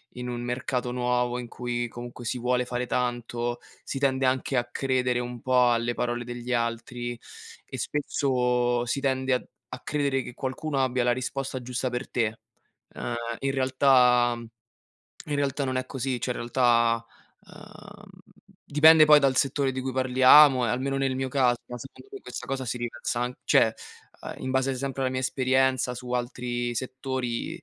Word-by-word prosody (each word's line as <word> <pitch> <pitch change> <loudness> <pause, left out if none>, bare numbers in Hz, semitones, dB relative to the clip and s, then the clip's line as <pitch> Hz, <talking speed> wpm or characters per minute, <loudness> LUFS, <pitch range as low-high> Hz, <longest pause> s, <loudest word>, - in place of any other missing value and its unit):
in 125 0 -5
un 120 -1 -4
mercato 125 0 -2
nuovo, 125 0 0
in 120 - -6
cui 120 0 -3
comunque 120 +1 -9
si 125 +2 -2
vuole 125 +1 +1
fare 125 0 -3
tanto, 120 -1 -2 0.3
si 135 - -4
tende 135 -1 +1
anche 130 +1 0
a 120 - +1
credere 125 0 0
un 120 0 -5
po' 125 -1 +4
alle 120 +1 0
parole 120 0 -2
degli 120 +1 -6
altri 120 +1 -2 0.5
e - - -8
spesso 125 -4 0
si 130 +3 -1
tende 130 -1 0
a 125 - 0 0.3
a - - -6
credere 140 -2 -1
che 125 - -9
qualcuno 135 +2 -2
abbia 125 -1 0
la 120 - +3
risposta 130 +1 -4
giusta 125 +1 -3
per 125 +1 -4
te. 110 -2 -1 0.6
Ehm, 120 - -4 0.2
i 135 0 -1
realtà 130 -2 +4
mhmm, 120 - -9 0.8
in 145 - -1
realtà 140 0 -1
non 130 -1 -2
è 130 - -2
così. 130 -2 -3
Cioè, - - -2
i - - -12
realtà, 120 -1 +2 0.4
uhm, - - -14 0.6
dipende 155 +2 +7
poi 150 -1 +7
dal 135 -2 +2
settore 135 0 +1
di 130 0 -4
cui 130 0 -3
parliamo 130 +1 +6
e - - 0
almeno 135 +3 -1
nel 135 -1 0
mio 130 0 -2
caso, 130 -3 +3
ma 125 - -7
secondo 135 - -12
me 405 - -8
questa - - -8
cosa 135 -1 -2
si 125 +1 -3
riversa 120 0 -3
an 125 +1 -1
cioè, - - +4 0.5
uhm, - - -6
in 130 - -3
base 130 0 +1
sempre 135 +1 -3
alla 130 - +1
mia 130 - -1
esperienza 130 -1 +1
su 125 +1 -8
altri 120 -1 -2
settori, 130 +4 -4
125 Hz, 175 wpm, -26 LUFS, 120-130 Hz, 0.8 s, dipende